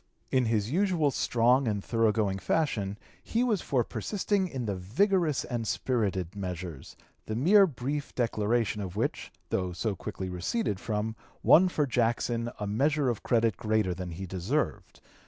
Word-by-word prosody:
In 130 Hz, -2 st, +3 dB
his 110 Hz, 0 st, 0 dB
usual 175 Hz, -4 st, +2 dB
strong 125 Hz, +2 st, +2 dB
and 105 Hz, -2 st, -1 dB
thorough 115 Hz, -2 st, +2 dB
going 100 Hz, -3 st, 0 dB
fashion 105 Hz, -9 st, 0 dB, 0.2 s
he 235 Hz, +2 st, 0 dB
was 220 Hz, -8 st, +1 dB
for 130 Hz, -3 st, +1 dB
(p. -, -, -22 dB
236) -, -, -17 dB, 0.4 s
persisting 190 Hz, -2 st, +3 dB
in 130 Hz, -7 st, -4 dB
the 100 Hz, -2 st, -1 dB
vigorous 155 Hz, -, +1 dB
and 120 Hz, -3 st, -3 dB
spirited 100 Hz, -8 st, -1 dB
measures, 90 Hz, -6 st, -6 dB, 0.3 s
the 110 Hz, -, -2 dB
mere 190 Hz, -, +6 dB
brief 140 Hz, 0 st, -4 dB
declaration 115 Hz, -2 st, 0 dB
of 95 Hz, -2 st, -6 dB
which, 110 Hz, -, -2 dB, 0.2 s
though 90 Hz, -1 st, -1 dB
so 100 Hz, +4 st, -2 dB
quickly 95 Hz, +1 st, -5 dB
receded 95 Hz, -, -2 dB
from, 110 Hz, +1 st, -2 dB, 0.3 s
won 185 Hz, +3 st, +7 dB
for 150 Hz, -4 st, +1 dB
Jackson 120 Hz, -1 st, 0 dB
a 105 Hz, -, -3 dB
measure 140 Hz, +7 st, +1 dB
of 120 Hz, -, -2 dB
credit 115 Hz, -4 st, +2 dB
greater 110 Hz, -5 st, +1 dB
than 90 Hz, 0 st, -6 dB
he 85 Hz, +3 st, -6 dB
deserved. 95 Hz, -, -2 dB
115 Hz, 165 wpm, -29 LUFS, 100-140 Hz, 0.4 s, won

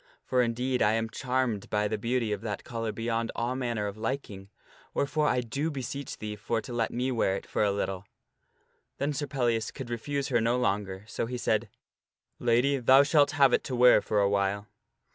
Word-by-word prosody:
For 125 Hz, -1 st, +2 dB
indeed 125 Hz, +2 st, 0 dB
I 105 Hz, -, +4 dB
am 115 Hz, 0 st, -1 dB
charmed 125 Hz, -5 st, -1 dB
by 105 Hz, 0 st, +1 dB
the 110 Hz, 0 st, -2 dB
beauty 115 Hz, 0 st, 0 dB
of 105 Hz, -2 st, -2 dB
that 105 Hz, -3 st, -4 dB
collar 115 Hz, -2 st, -3 dB
beyond 115 Hz, 0 st, -2 dB
all 120 Hz, +2 st, -1 dB
manner 120 Hz, -5 st, -2 dB
of 100 Hz, +1 st, -5 dB
liking, 110 Hz, -5 st, -4 dB, 0.5 s
wherefore 150 Hz, +1 st, +1 dB
I 125 Hz, -, +2 dB
do 140 Hz, +7 st, -2 dB
beseech 140 Hz, -1 st, -5 dB
thee 105 Hz, 0 st, -5 dB
for 110 Hz, +2 st, -2 dB
to 120 Hz, -, -8 dB
let 115 Hz, -1 st, 0 dB
me 125 Hz, +2 st, -1 dB
wear 105 Hz, -5 st, +1 dB
it -, -, -6 dB
for -, -, 0 dB
a 105 Hz, -, +3 dB
little." 100 Hz, -1 st, -3 dB, 0.9 s
Then 145 Hz, +2 st, -1 dB
Sir 145 Hz, +1 st, -3 dB
Pellias 120 Hz, -5 st, 0 dB
could 130 Hz, -4 st, -7 dB
refuse 140 Hz, +4 st, -2 dB
her 120 Hz, -3 st, +2 dB
no 120 Hz, +2 st, +2 dB
longer, 100 Hz, -4 st, -1 dB
so 115 Hz, -, -3 dB
he 125 Hz, +1 st, -4 dB
said, 110 Hz, -2 st, 0 dB, 0.4 s
" -, -, -66 dB, 0.3 s
Lady, 125 Hz, +4 st, +3 dB
thou 130 Hz, +2 st, +6 dB
shalt 145 Hz, 0 st, +4 dB
have 135 Hz, -3 st, +6 dB
it -, -, +3 dB
to 130 Hz, -, -3 dB
wear 125 Hz, -3 st, +6 dB
for 105 Hz, -, 0 dB
a 100 Hz, -, +4 dB
while." 100 Hz, 0 st, 0 dB
120 Hz, 205 wpm, -28 LUFS, 105-130 Hz, 0.9 s, thou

